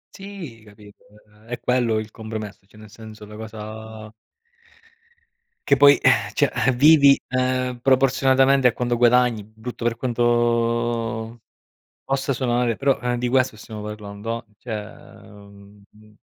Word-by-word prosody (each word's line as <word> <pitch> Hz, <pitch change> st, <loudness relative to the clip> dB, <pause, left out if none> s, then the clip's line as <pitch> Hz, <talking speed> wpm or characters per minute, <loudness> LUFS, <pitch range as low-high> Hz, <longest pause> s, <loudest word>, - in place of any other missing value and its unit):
Sì, 195 Hz, -, -10 dB
capito? 105 Hz, -1 st, -18 dB, 0.2 s
Uhm, 105 Hz, +1 st, -24 dB
è 120 Hz, +1 st, -5 dB
quello 120 Hz, -3 st, 0 dB
il 110 Hz, 0 st, -5 dB
compromesso, 110 Hz, -3 st, -8 dB
cioè 105 Hz, +2 st, -19 dB
nel 105 Hz, -1 st, -14 dB
senso 110 Hz, -1 st, -12 dB
la 105 Hz, 0 st, -12 dB
cosa 110 Hz, 0 st, -9 dB, 1.5 s
che 140 Hz, -, +4 dB
poi, 145 Hz, +1 st, +7 dB
eh, -, -, +2 dB
cioè, -, -, +1 dB, 0.2 s
eh, -, -, +5 dB
vivi, 140 Hz, +1 st, +6 dB
ehm, 130 Hz, -1 st, -1 dB
proporzionalmente 135 Hz, +1 st, +3 dB
a 120 Hz, -, +1 dB
quanto 120 Hz, -1 st, -2 dB
guadagni, 120 Hz, -3 st, +3 dB
brutto 110 Hz, +3 st, -8 dB
per 120 Hz, -1 st, +1 dB
quanto 120 Hz, -1 st, -1 dB, 0.7 s
possa 135 Hz, 0 st, -1 dB
suonare, 120 Hz, -2 st, 0 dB
però 135 Hz, -1 st, 0 dB
eh, 125 Hz, 0 st, -2 dB
di 125 Hz, 0 st, -1 dB
questo 130 Hz, -2 st, +1 dB
stiamo 110 Hz, 0 st, -9 dB
parlando. 105 Hz, +2 st, -6 dB
Cioè, 115 Hz, -3 st, -5 dB, 0.5 s
uhm 100 Hz, +1 st, -18 dB
115 Hz, 135 wpm, -22 LUFS, 110-125 Hz, 1.5 s, poi